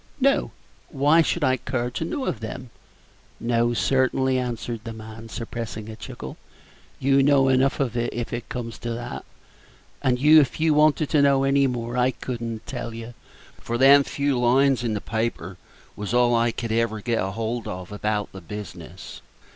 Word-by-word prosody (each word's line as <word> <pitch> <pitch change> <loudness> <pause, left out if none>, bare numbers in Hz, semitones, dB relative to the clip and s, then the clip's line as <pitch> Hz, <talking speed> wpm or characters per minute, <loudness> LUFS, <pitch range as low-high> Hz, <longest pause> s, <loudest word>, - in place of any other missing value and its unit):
"No. 275 +1 +2 0.4
What 150 +2 +3
should 175 - 0
I 130 -1 +3
care 125 -1 -3
to 145 - -3
know 260 - -3
of 110 - -2
them?" 120 +3 -7 0.7
"No, 120 0 +1
certainly," 130 +1 +2
answered 120 -1 -4
the 115 - -6
man, 110 +1 -10
suppressing 115 -2 -6
a 110 - -7
chuckle; 115 - -8 0.6
"you 135 +1 +3
know 135 -1 +4
enough, 130 +1 +2
if 120 -2 -2
it 120 0 -5
comes 115 -3 -5
to 120 - -5
that; 120 +1 -6 0.8
and 125 -1 +2
if 150 +2 +5
you 160 -1 +3
wanted 150 0 +3
to 150 - +4
know 140 -1 +4
any 135 0 +3
more, 120 -1 -3
I 125 +1 +3
could 125 -2 -5
n't 115 -2 -5
tell 115 -2 -5
you, 115 +1 -8 0.5
for 120 - -3
them 140 +2 +7
few 140 -2 -1
lines 130 +1 +3
in 115 -3 -1
the 105 - -3
paper 110 -5 -3 0.4
is 105 +3 -3
all 120 0 +4
I 115 0 +3
could 115 0 -4
ever 110 -1 0
get 115 +1 -1
hold 110 +4 -3
of 90 +1 -6
about 105 0 -2
the 95 - -10
business. 105 +2 -9
120 Hz, 170 wpm, -24 LUFS, 115-135 Hz, 0.8 s, them